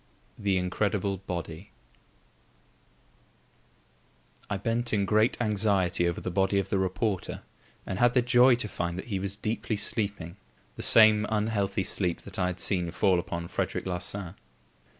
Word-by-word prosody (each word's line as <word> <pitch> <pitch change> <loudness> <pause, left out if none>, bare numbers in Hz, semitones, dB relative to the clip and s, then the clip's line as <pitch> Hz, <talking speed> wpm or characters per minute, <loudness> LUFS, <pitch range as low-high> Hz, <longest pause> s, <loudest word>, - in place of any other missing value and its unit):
The 100 -2 0
Incredible 100 +2 -1
Body 90 0 -6 2.8
I 100 - -1
bent 115 +4 -1
in 100 -2 +2
great 110 +3 +2
anxiety 100 -6 +1
over 85 - -4
the 90 - -4
body 95 +2 +1
of 100 -1 -1
the 100 - +1
reporter 95 +1 -2 0.4
and 95 0 -4
had 120 +1 +3
the 125 - +4
joy 125 +1 +5
to 120 -2 -3
find 85 -2 -4
that 95 - -7
he 100 -3 -1
was 100 +1 -2
deeply 110 +1 -3
sleeping, 100 -4 -2 0.4
the - - -7
same 110 -1 +6
unhealthy 105 -3 0
sleep 90 -2 -1
that 100 -1 -9
I 90 - +2
had 90 0 -4
seen 90 -4 0
fall 90 +1 +2
upon 85 -1 -5
Frederic - - -3
Larsan. 90 0 -3
100 Hz, 150 wpm, -28 LUFS, 90-110 Hz, 2.8 s, same